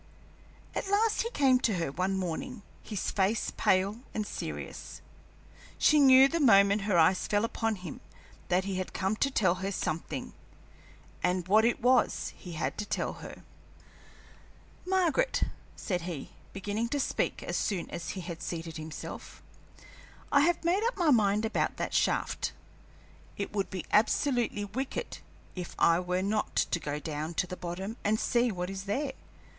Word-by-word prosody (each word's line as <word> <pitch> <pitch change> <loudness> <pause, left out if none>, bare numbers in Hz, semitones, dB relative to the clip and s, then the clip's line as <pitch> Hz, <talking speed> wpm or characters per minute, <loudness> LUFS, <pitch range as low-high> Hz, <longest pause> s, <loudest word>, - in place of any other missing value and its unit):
At 390 - -3
last 425 +2 +3
he 465 - -2
came 265 - +4
to 225 -5 +1
her 165 -5 -1
one 185 +5 -1
morning, 195 +6 -4 0.2
his 210 -4 -3
face 200 +2 0
pale 195 +4 +2 0.2
and 215 - -1
serious. - - -6 0.8
She 305 - +5
knew 265 -1 +8
the 335 +4 -1
moment 200 -6 +5
her 185 - +3
eyes 170 +3 +4
fell 205 +1 +2
upon 225 -1 -1
him 180 -5 -8 0.5
that 180 +1 +2
he 195 -1 -3
had 185 - -4
come 190 +3 0
to 275 - +2
tell 195 -9 +3
her 195 +1 -1
something, 165 -4 -3 0.9
and 180 0 0
what 215 +3 +5
it 240 0 +1
was 250 0 +2
he 180 -3 -9
had 160 - -3
to 210 - -2
tell. - - -2 1.7
"Margaret," 380 +7 +2 0.3
said 180 -4 -2
he, 165 -5 -6 0.2
beginning 205 +4 -2
to 285 - -1
speak - - -1
as - - -3
soon 190 -5 -1
as 170 - -5
he - - -3
had 170 -1 -7
seated 165 -1 -5
himself, 155 0 -8 0.9
"I 285 - +6
have 340 +4 +2
made 370 +5 +2
up 475 0 0
my 340 -5 +3
mind 210 -3 +3
about 220 - 0
that - - -3
shaft. - - 0 0.8
It 200 - -4
would 200 -2 -1
be 185 - -5
absolutely 235 -1 +2
wicked 255 +7 -4 0.4
if 180 -2 -6
I 170 +1 +4
were 180 +1 -1
not 210 +2 -1
to 175 - +1
go 145 -2 -3
down 155 +2 -4
to - - +1
the 180 - -6
bottom 185 +6 -5
and 215 +1 +2
see 240 0 +2
what 180 -1 -3
is 195 0 -6
there. 265 +8 -1
200 Hz, 160 wpm, -30 LUFS, 180-250 Hz, 1.7 s, knew